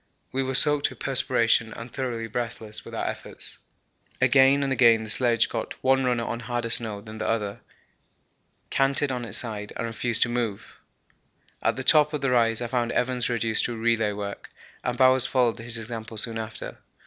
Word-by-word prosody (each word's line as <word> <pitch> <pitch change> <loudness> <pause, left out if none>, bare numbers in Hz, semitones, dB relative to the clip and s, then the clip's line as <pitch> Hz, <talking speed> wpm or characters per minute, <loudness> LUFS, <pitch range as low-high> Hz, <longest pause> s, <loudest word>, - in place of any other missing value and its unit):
We 135 - 0
were 130 0 -2
soaked 145 +1 +5
with - - -12
perspiration 120 -4 +1
and 115 +1 -9
thoroughly 120 -4 -3
breathless 115 -1 -5
with - - -9
our - - -2
efforts. - - -6 0.6
Again 135 +1 +5
and 135 -1 0
again 115 -4 +5
the 110 - -4
sledge 120 -1 +3
got - - -5
one 135 0 +3
runner 125 -2 0
on 115 - -4
harder 120 0 -3
snow 110 -3 -1
than 110 0 -10
the - - -2
other, 105 -1 -2 1.1
canted 135 0 +1
on 125 -2 -3
its - - +1
side, 105 -3 -2
and - - -3
refused 115 0 +2
to 120 - -2
move. 120 -4 -4 0.8
At - - +1
the - - -5
top 150 0 +5
of 150 - -2
the 135 -2 0
rise 115 -1 +2
I - - -3
found 120 -1 -1
Evans 125 0 0
reduced 115 -2 +1
to 120 - -4
relay 115 -2 +1
work, 100 0 -6 0.3
and 125 0 -2
Bowers 130 -1 +5
followed 125 -3 +1
his 115 0 -5
example 115 0 -7
soon 115 +1 -1
after. 110 0 -7
120 Hz, 185 wpm, -25 LUFS, 115-130 Hz, 1.1 s, soaked